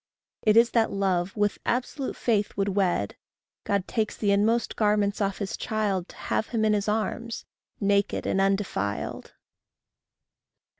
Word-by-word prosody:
It 215 Hz, 0 st, +4 dB
is 235 Hz, +1 st, +6 dB
that 225 Hz, -2 st, +2 dB
love 190 Hz, -1 st, 0 dB
with 205 Hz, 0 st, +1 dB
absolute 255 Hz, +2 st, -2 dB
faith 210 Hz, -4 st, 0 dB
would 200 Hz, 0 st, +1 dB
wed; 185 Hz, -, 0 dB, 0.5 s
God 200 Hz, -2 st, 0 dB
takes 220 Hz, -3 st, -1 dB
the 205 Hz, -2 st, +1 dB
inmost 220 Hz, +4 st, +2 dB
garments 210 Hz, -1 st, +1 dB
off 195 Hz, -1 st, 0 dB
his 200 Hz, -2 st, -3 dB
child, 205 Hz, -5 st, -1 dB
To -, -, -13 dB
have 220 Hz, -, -1 dB
him 225 Hz, -3 st, 0 dB
in 215 Hz, -, +3 dB
his 205 Hz, 0 st, 0 dB
arms, 225 Hz, +2 st, -2 dB, 0.3 s
naked 200 Hz, 0 st, +1 dB
and 195 Hz, -, +1 dB
undefiled. 195 Hz, -, -1 dB
205 Hz, 145 wpm, -26 LUFS, 195-220 Hz, 0.5 s, is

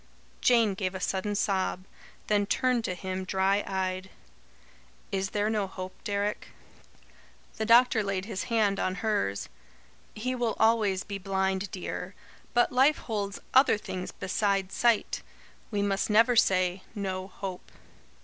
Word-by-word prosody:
Jane 230 Hz, -4 st, +4 dB
gave 190 Hz, -1 st, -3 dB
a -, -, -3 dB
sudden 195 Hz, +2 st, -1 dB
sob; 190 Hz, -2 st, 0 dB, 0.4 s
then 205 Hz, -1 st, +1 dB
turned 250 Hz, 0 st, +1 dB
to 185 Hz, -, -2 dB
him, 185 Hz, +1 st, -4 dB
dry 195 Hz, +2 st, +1 dB
eyed. 185 Hz, 0 st, -2 dB, 1.0 s
"Is 190 Hz, 0 st, -1 dB
there 205 Hz, +1 st, 0 dB
no 215 Hz, -3 st, 0 dB
hope, 185 Hz, 0 st, -7 dB
Deryck?" 205 Hz, 0 st, -2 dB, 1.1 s
The 220 Hz, -, -2 dB
doctor 240 Hz, -1 st, +6 dB
laid 195 Hz, -1 st, -2 dB
his 205 Hz, -1 st, -4 dB
hand 215 Hz, -5 st, +1 dB
on 185 Hz, -, 0 dB
hers. 100 Hz, -, 0 dB, 0.7 s
"He 250 Hz, +4 st, -2 dB
will 240 Hz, -3 st, -1 dB
always 215 Hz, -4 st, +3 dB
be 200 Hz, -1 st, -6 dB
blind, 190 Hz, 0 st, -1 dB
dear. 185 Hz, +1 st, -5 dB, 0.4 s
But 240 Hz, -, +4 dB
life 270 Hz, +4 st, +4 dB
holds 205 Hz, -3 st, -3 dB, 0.2 s
other 260 Hz, -4 st, +6 dB
things 185 Hz, -3 st, -5 dB
beside 195 Hz, 0 st, -1 dB
sight. 235 Hz, -3 st, +1 dB, 0.5 s
We 205 Hz, -2 st, -1 dB
must 195 Hz, +1 st, 0 dB
never 230 Hz, +3 st, +5 dB
say: 185 Hz, -3 st, +3 dB
'No 190 Hz, -2 st, -3 dB
hope.'" 190 Hz, -1 st, -7 dB
200 Hz, 140 wpm, -28 LUFS, 190-220 Hz, 1.1 s, doctor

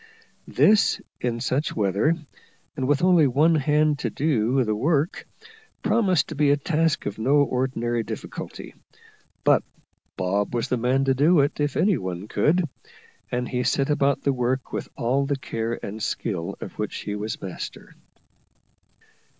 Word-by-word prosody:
This, 210 Hz, 0 st, +4 dB, 0.2 s
in 120 Hz, -1 st, -2 dB
such 135 Hz, +4 st, -1 dB
weather, 105 Hz, -, +2 dB, 0.6 s
and 130 Hz, -3 st, -2 dB
with 145 Hz, +3 st, +2 dB
only 175 Hz, -5 st, +5 dB
one 150 Hz, +6 st, +3 dB
hand 150 Hz, 0 st, +2 dB
to -, -, -1 dB
do 130 Hz, -3 st, +1 dB
the 110 Hz, -2 st, -1 dB
work, 150 Hz, +6 st, 0 dB, 0.6 s
promised 210 Hz, -6 st, +2 dB
to 155 Hz, -, -6 dB
be 145 Hz, 0 st, +3 dB
a 145 Hz, -, +4 dB
task 160 Hz, +1 st, 0 dB
of 105 Hz, +1 st, -4 dB
no 140 Hz, +5 st, +4 dB
ordinary 125 Hz, -3 st, -1 dB
difficulty; -, -, -7 dB, 0.7 s
but -, -, +5 dB, 0.6 s
Bob 100 Hz, +4 st, -1 dB
was 120 Hz, -, -1 dB
the 125 Hz, -, +1 dB
man 130 Hz, +3 st, +1 dB
to 135 Hz, -, +3 dB
do 150 Hz, +4 st, +4 dB
it 140 Hz, +2 st, -1 dB
if 145 Hz, -2 st, 0 dB
any 200 Hz, -2 st, +3 dB
one 95 Hz, +1 st, -5 dB
could, 170 Hz, +8 st, +2 dB, 0.6 s
and 125 Hz, 0 st, -1 dB
he 125 Hz, -1 st, -1 dB
set 135 Hz, +4 st, +1 dB
about 140 Hz, -2 st, +1 dB
the 140 Hz, -, +2 dB
work 125 Hz, +1 st, -2 dB
with -, -, -4 dB
all 135 Hz, +2 st, +1 dB
the 140 Hz, -1 st, 0 dB
care 115 Hz, -3 st, -3 dB
and 105 Hz, +2 st, -6 dB
skill 90 Hz, -7 st, -3 dB
of -, -, -9 dB
which -, -, -3 dB
he 105 Hz, -, -4 dB
was 105 Hz, +1 st, -4 dB
master. 95 Hz, -2 st, -7 dB
135 Hz, 160 wpm, -24 LUFS, 115-150 Hz, 0.7 s, only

